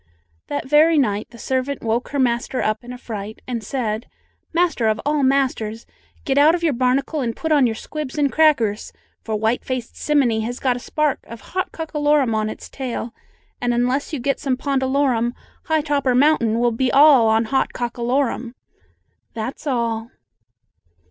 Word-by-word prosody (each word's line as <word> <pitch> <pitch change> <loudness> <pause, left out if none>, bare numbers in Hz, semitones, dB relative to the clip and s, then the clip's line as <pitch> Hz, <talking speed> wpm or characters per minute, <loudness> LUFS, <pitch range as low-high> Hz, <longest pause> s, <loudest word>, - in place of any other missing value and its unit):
'" 80 -1 -42
That 285 -2 -3
very 305 +3 +5
night 210 -7 +1
the 240 - -14
servant 260 +4 -2
woke 230 +2 -1
her 285 - -3
master 250 0 0
up 215 +2 -1
in 245 - -9
a 250 - -7
fright 215 -3 -7
and 235 -3 -3
said: 220 -1 -3 0.4
"Master 335 -9 +1
of 220 0 +1
all 295 0 +1
Masters, 260 -5 0 0.4
get 275 -2 +2
out 310 +4 +6
of 345 - -5
your 315 -4 +2
barnacle 260 +5 0
and 230 -3 -2
put 320 - -3
on 285 -4 +5
your 225 - -2
squibs 300 +4 -6
and 285 -2 +2
crackers. 255 -10 +2 0.3
For 220 - -2
white 220 +3 0
faced 255 -3 -4
simminy 270 -7 +1
has 240 +3 -4
got 255 -2 +1
a - - -5
spark 300 +3 -1
of 230 -1 -10
hot 370 0 -1
cockalorum 295 -5 +1
on 215 0 0
its - - -8
tail, 245 -3 -5 0.5
and 240 -1 +1
unless 250 +4 0
you 305 - -2
get 275 +2 -1
some 265 -3 -1
pondalorum, 265 -3 0 0.3
high 315 -2 +2
topper 280 -4 +1
mountain 250 -5 +3
will 240 0 +2
be 250 +3 0
all 275 -5 +7
on 220 +1 +3
hot 265 +3 0
cockalorum."... 245 0 -2 0.8
That's 240 +7 -5
all. 235 -3 -1
255 Hz, 175 wpm, -21 LUFS, 230-285 Hz, 0.8 s, all